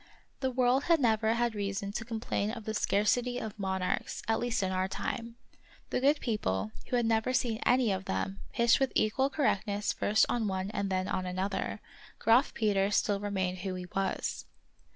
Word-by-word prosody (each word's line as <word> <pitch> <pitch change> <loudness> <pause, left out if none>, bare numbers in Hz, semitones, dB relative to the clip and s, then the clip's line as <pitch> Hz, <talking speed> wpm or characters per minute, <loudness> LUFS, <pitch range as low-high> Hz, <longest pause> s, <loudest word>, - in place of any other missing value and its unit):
The 260 - 0
world 255 +1 +2
has 335 -1 +5
never 225 -4 +2
had 240 -1 +1
reason 200 -1 -3
to 220 - -4
complain 225 -2 -2
of 225 -1 -6
the 220 - -2
scarcity 235 +4 +1
of 220 -3 -6
monarchs, 190 -2 -2
at 225 - +2
least 240 -3 0
in 190 - 0
our 185 0 0
time. 230 +4 -4 0.6
The - - +1
good 290 +3 +4
people, 105 - -1 0.2
who - - -1
had 240 -1 +2
never 225 +2 +1
seen 240 -3 0
any 250 -4 +4
of 190 0 -2
them, 95 +1 -2
pitched 235 0 +4
with 270 -1 +1
equal 265 +6 +2
cor 290 -1 -1
rectness 205 -1 0
first 215 +1 +3
on 235 -3 0
one 190 0 -2
and 200 -2 -2
then 185 0 0
on 185 0 -2
another; 190 +3 -2 0.4
Graf 230 +4 +4
Peter 200 -3 +2
still 205 -1 +1
remained 190 -3 -2
who 185 0 -3
he 180 0 -5
was. 195 -1 -1
215 Hz, 190 wpm, -30 LUFS, 190-240 Hz, 0.6 s, has